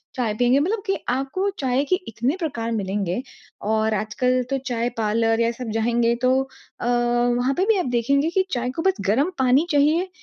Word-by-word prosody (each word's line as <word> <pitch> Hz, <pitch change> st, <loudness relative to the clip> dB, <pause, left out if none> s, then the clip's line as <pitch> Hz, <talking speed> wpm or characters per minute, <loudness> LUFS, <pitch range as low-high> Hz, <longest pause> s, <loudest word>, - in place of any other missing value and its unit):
चाय 235 Hz, -4 st, -1 dB
पिएँगे। 245 Hz, +2 st, +3 dB
मतलब 400 Hz, +8 st, 0 dB
की 390 Hz, -2 st, +1 dB
आपको 275 Hz, +10 st, -1 dB
चाय 265 Hz, 0 st, +1 dB
के -, -, +4 dB
इतने 235 Hz, +7 st, -1 dB
प्रकार 235 Hz, -9 st, -3 dB
मिलेंगे 195 Hz, -2 st, -2 dB, 0.4 s
और 220 Hz, +1 st, +1 dB
आजकल 235 Hz, +5 st, 0 dB
तो 275 Hz, -, 0 dB
चाय 235 Hz, 0 st, 0 dB
पार्लर 225 Hz, +1 st, +1 dB
या 230 Hz, 0 st, +2 dB
सब 235 Hz, 0 st, -7 dB
जाएँगे। 235 Hz, +1 st, +2 dB
तो 255 Hz, 0 st, +3 dB, 0.5 s
अ, -, -, -4 dB
वहाँ 240 Hz, +1 st, +1 dB
पे 375 Hz, -, +2 dB
भी 440 Hz, -1 st, +3 dB
आप -, -, -1 dB
देखेंगे। 280 Hz, +6 st, +2 dB
कि 375 Hz, +2 st, +1 dB
चाय 245 Hz, 0 st, -1 dB
को 325 Hz, -, -2 dB
बस 380 Hz, -, +4 dB
गर्म 275 Hz, -, +2 dB
पानी 260 Hz, +4 st, +4 dB
चाहिए, 310 Hz, +5 st, +2 dB
245 Hz, 190 wpm, -23 LUFS, 230-280 Hz, 0.5 s, के